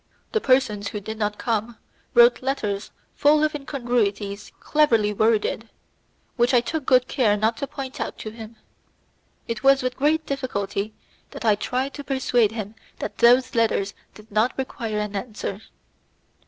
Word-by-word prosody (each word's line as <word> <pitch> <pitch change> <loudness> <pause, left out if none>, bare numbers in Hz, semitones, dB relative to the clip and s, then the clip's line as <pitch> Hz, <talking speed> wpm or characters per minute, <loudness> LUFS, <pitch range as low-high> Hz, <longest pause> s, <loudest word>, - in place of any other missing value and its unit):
The 440 - +1
persons 240 -6 +2
who 210 - -4
did 220 +2 -7
not 210 -1 -1
come 225 -1 -2 0.4
wrote 480 -5 +6
letters 215 -7 -2 0.2
full 300 +1 +4
of 310 - +1
incongruities 235 -8 -2
cleverly 230 -9 +2
worded, 220 +1 +1 0.7
which 245 +1 +3
I - - +7
took 280 +4 -4
good 255 -1 +4
care 220 -7 +2
not 220 +2 +1
to 280 - -3
point 265 -2 -7
out - - -4
to 215 - -7
him. 225 0 -10 0.9
It 230 -1 -3
was 275 -1 +5
with 255 0 -1
great 310 +3 +2
difficulty 215 -7 -3 0.3
that - - -8
I 215 - +5
tried 255 +6 -2
to 285 - -7
persuade 250 -5 +1
him 215 -2 -5 0.2
that - - -6
those 250 +2 +5
letters 220 -4 +1 0.2
did 215 0 -15
not 215 +4 +1
require 230 -5 -3
any 210 -1 -2
answer. 210 -3 -6
235 Hz, 155 wpm, -24 LUFS, 210-265 Hz, 0.9 s, I